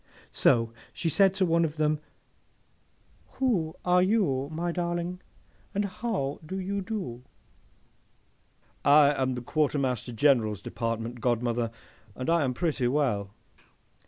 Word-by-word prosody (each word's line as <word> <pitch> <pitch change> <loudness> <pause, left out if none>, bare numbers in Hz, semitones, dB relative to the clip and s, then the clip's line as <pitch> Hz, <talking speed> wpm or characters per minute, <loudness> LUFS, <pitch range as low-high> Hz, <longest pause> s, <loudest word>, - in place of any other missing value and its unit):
So, 115 -1 +3 0.2
she 165 - -2
said 195 +4 +4
to 190 -1 +2
one 170 -1 +3
of 160 -1 -2
them, 155 0 +1 1.3
'Who 195 -12 0
are 180 0 +4
you, 180 -10 +1
my 170 +2 -2
darling, 175 +1 -2 0.5
and 205 +1 +1
how 190 -8 -3
do 185 +5 -5
you 200 +2 -2 2.0
do?'—'I 145 0 +6
am 130 -1 +1
the 125 - -5
Quartermaster 135 -4 0
General's 110 -5 +2
Department, 115 +1 -3
godmother, 120 -1 0 0.5
and 130 +5 -2
I 170 -2 +3
am 130 -2 -1
pretty 145 -6 0
well. 120 -8 0
150 Hz, 120 wpm, -28 LUFS, 125-175 Hz, 2.0 s, do?'—'I